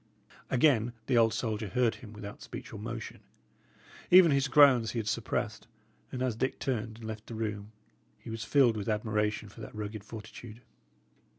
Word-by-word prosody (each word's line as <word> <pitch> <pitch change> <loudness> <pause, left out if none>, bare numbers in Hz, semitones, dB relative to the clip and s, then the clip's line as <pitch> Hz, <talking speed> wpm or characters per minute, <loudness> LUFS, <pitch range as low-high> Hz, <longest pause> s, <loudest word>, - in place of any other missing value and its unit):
Again 120 -3 +3
the 130 - +1
old 115 -1 +5
soldier 110 -2 -2
heard 115 +4 +2
him 120 -5 -11
without 105 -1 -9
speech - - -8
or 110 - -7
motion; 115 +1 -6 0.9
even 180 -3 +8
his 140 0 +2
groans 130 -5 +6
he - - -4
had 110 -2 -2
suppressed; - - -2 0.4
and 130 0 -3
as 125 -4 0
Dick 130 +4 -1
turned 115 -4 -3
and 115 - -13
left 110 -1 -7
the 115 - -7
room, 105 -1 -4 0.5
he - - -9
was 115 0 -4
filled 125 -4 +4
with 105 +1 -3
admiration 105 0 -1
for 105 +3 -13
that 110 - -9
rugged 105 -1 -5
fortitude. 110 +1 -10
115 Hz, 175 wpm, -30 LUFS, 105-125 Hz, 0.9 s, even